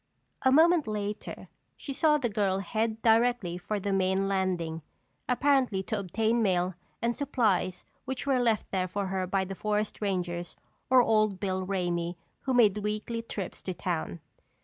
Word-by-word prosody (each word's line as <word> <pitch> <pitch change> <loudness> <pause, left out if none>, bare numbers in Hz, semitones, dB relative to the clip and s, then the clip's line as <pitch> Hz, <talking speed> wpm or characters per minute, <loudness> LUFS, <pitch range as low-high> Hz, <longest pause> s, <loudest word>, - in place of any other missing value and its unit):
A 260 - +4
moment 325 +1 +5
later 210 -1 -4 0.3
she 275 - -6
saw 300 +2 +4
the 270 -5 0
girl 200 -3 0
head 220 +3 -2
directly 225 -6 +3
for 210 +3 -3
the 200 0 -1
main 190 0 +1
landing, 180 -4 -1 0.5
apparently 250 -6 +2
to 220 +2 -2
obtain 220 +5 0
mail 185 -3 +1 0.3
and 235 0 +1
supplies 225 -10 0 0.2
which 265 0 -4
were 270 -2 +2
left 230 -4 +1
there 185 -1 0
for 200 +2 -2
her 190 -1 -2
by 190 +1 0
the 195 - -5
forest 210 +2 -2
rangers 175 -3 -2 0.3
or 255 -1 +7
old 215 -4 +2
Bill 190 -1 -1
Ramey 175 -2 -1 0.3
who 265 - +1
made 210 -4 +5
weekly 215 +2 -3
trips 205 -4 -6
to 185 - -4
town. 160 - -3
205 Hz, 160 wpm, -29 LUFS, 185-235 Hz, 0.5 s, or